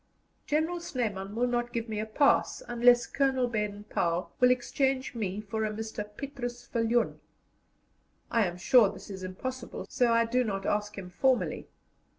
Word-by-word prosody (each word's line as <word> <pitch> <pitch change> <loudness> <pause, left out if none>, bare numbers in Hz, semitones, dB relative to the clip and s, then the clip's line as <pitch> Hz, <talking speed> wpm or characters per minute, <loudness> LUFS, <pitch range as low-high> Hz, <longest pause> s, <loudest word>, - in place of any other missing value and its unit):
General 320 +4 0
Snyman 210 - -3
will 240 +2 +2
not 240 -1 -1
give 235 -1 -3
me 215 -1 -3
a 215 - -3
pass 280 - +2
unless 240 0 +5
Colonel 265 -2 +1
Baden 210 -3 -3
Powell 175 -3 -1
will 250 - +6
exchange 260 +1 0
me 205 -4 -3
for 220 +1 -3
a 215 - 0
Mr. 215 -1 -5
Petrus 245 -3 -5
Viljoen. 230 0 0 1.1
I 230 -4 +3
am 175 0 -6
sure 215 +4 +5
this 200 +1 -10
is 190 -1 -7
impossible, 240 +7 -5
so 245 -2 +2
I 230 0 +4
do 250 +2 +1
not 195 -4 -3
ask 210 0 -1
him 180 -2 -7
formally. 260 +7 +1
230 Hz, 165 wpm, -29 LUFS, 210-250 Hz, 1.1 s, will